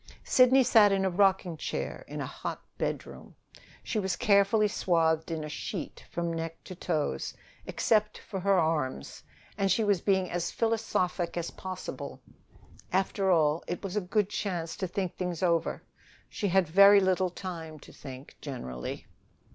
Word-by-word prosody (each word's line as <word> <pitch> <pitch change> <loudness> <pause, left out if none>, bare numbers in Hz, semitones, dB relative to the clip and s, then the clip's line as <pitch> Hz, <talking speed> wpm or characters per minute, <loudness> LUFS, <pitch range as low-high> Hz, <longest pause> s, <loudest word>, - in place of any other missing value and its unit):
Sidney 260 +1 +5
sat 220 -4 +6
in 195 -1 +1
a 190 - +1
rocking 190 -2 +2
chair - - -4
in - - -5
a - - -2
hot - - -6 0.2
bedroom. - - -4 0.5
She 220 - -1
was 190 -2 -1
carefully 210 -1 +4
swathed 165 -5 +1
in 160 -2 -3
a - - -4
sheet 150 - -6
from 170 -1 -2
neck 165 0 -5
to - - -8
toes, 155 - -2 0.3
except 215 -1 +1
for 195 - -6
her 195 +1 +3
arms, 150 - -1 0.4
and 195 -1 +2
she 220 +4 +3
was 200 -4 +2
being 190 -2 +2
as 175 0 -1
philosophic 205 -6 -1
as 170 -1 -3
possible. 185 -1 -7 0.7
After 195 +1 +1
all, 155 -2 +3
it 175 - -4
was 195 0 -4
a 210 - +1
good 195 +2 +1
chance 175 -7 -3
to 190 - -2
think 185 0 -3
things 180 -2 -3
over. 170 -2 +1 0.4
She 205 - -3
had 190 -1 +3
very 200 +5 +8
little 185 -1 +2
time 170 -4 -7
to - - -14
think, 130 +1 -10
generally. 65 - -6
185 Hz, 160 wpm, -29 LUFS, 165-200 Hz, 0.7 s, very